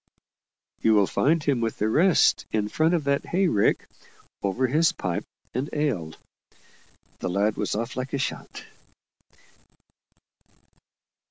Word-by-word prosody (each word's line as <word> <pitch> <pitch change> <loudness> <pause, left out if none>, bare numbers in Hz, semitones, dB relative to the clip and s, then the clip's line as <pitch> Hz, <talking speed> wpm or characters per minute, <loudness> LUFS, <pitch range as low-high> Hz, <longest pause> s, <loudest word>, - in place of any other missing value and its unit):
"You'll 105 -3 +4
find 155 - +1
him 135 -5 +1
with 115 -1 -2
the 105 - 0
rest, 165 - +3
in 105 -1 0
front 160 +7 +2
of 165 - -1
that 140 0 0
hay 185 +2 +2
rick, 105 -11 +1 0.5
over 100 +7 0
his 155 +6 +3
pipe 90 -3 -3 0.3
and 130 +4 -2
ale." 110 - -1 1.0
The - - -3
lad 100 +3 +1
was - - -2
off 115 +3 -3
like 130 +1 -4
a - - +1
shot. 130 - -5
130 Hz, 125 wpm, -25 LUFS, 105-150 Hz, 1.0 s, You'll